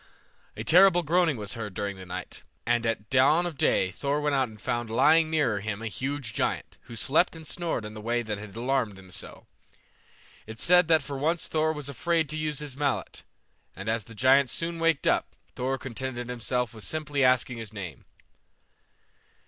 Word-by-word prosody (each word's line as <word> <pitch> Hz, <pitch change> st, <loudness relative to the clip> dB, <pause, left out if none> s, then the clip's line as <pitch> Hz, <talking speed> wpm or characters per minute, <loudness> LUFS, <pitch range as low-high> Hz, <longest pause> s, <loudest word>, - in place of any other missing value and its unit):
A -, -, -4 dB
terrible 175 Hz, +1 st, +6 dB
groaning 165 Hz, -2 st, +2 dB
was 105 Hz, -2 st, -3 dB
heard 105 Hz, -5 st, -6 dB
during 100 Hz, -1 st, -3 dB
the 95 Hz, -1 st, -11 dB
night, 90 Hz, -, -7 dB, 0.2 s
and 120 Hz, 0 st, +1 dB
at 110 Hz, -1 st, -3 dB
dawn 140 Hz, +7 st, +4 dB
of 175 Hz, -3 st, -4 dB
day 95 Hz, -7 st, +2 dB
Thor 140 Hz, +5 st, -1 dB
went 150 Hz, -1 st, 0 dB
out 130 Hz, -3 st, +2 dB
and 110 Hz, -1 st, -14 dB
found 120 Hz, +2 st, -2 dB
lying 155 Hz, +7 st, +4 dB
near 145 Hz, -10 st, +1 dB
him 105 Hz, +1 st, -4 dB
a -, -, -2 dB
huge 130 Hz, +2 st, -3 dB
giant, -, -, -2 dB
who 115 Hz, -, -10 dB
slept 150 Hz, +10 st, +2 dB
and 160 Hz, -1 st, -10 dB
snored 165 Hz, -8 st, -3 dB
in 105 Hz, -, -7 dB
the 110 Hz, -, -8 dB
way 120 Hz, +2 st, 0 dB
that 105 Hz, -2 st, -4 dB
had 105 Hz, -1 st, -10 dB
alarmed 120 Hz, -3 st, 0 dB
them 95 Hz, -1 st, -14 dB
so. -, -, -7 dB, 1.0 s
It 110 Hz, 0 st, -8 dB
is -, -, -4 dB
said 180 Hz, -1 st, +6 dB
that 160 Hz, -3 st, +4 dB
for 140 Hz, -1 st, -5 dB
once 165 Hz, +4 st, 0 dB
Thor 155 Hz, 0 st, +1 dB
was 150 Hz, -3 st, -5 dB
afraid 160 Hz, +3 st, 0 dB
to 155 Hz, -, -4 dB
use 155 Hz, -1 st, -2 dB
his 145 Hz, -3 st, -6 dB
mallet, 140 Hz, -2 st, -2 dB, 0.5 s
and 100 Hz, +2 st, -8 dB
as 110 Hz, -1 st, -1 dB
the 115 Hz, -, -12 dB
giant 130 Hz, +3 st, +4 dB
soon 165 Hz, +5 st, -3 dB
waked 165 Hz, -3 st, +2 dB
up, -, -, +1 dB, 0.2 s
Thor 130 Hz, +2 st, -1 dB
contented 125 Hz, -1 st, -5 dB
himself 125 Hz, 0 st, -2 dB
with 110 Hz, -2 st, -9 dB
simply 145 Hz, +1 st, -1 dB
asking 125 Hz, -1 st, +3 dB
his 115 Hz, -2 st, -6 dB
name. 95 Hz, -8 st, -8 dB
130 Hz, 195 wpm, -27 LUFS, 110-155 Hz, 1.0 s, terrible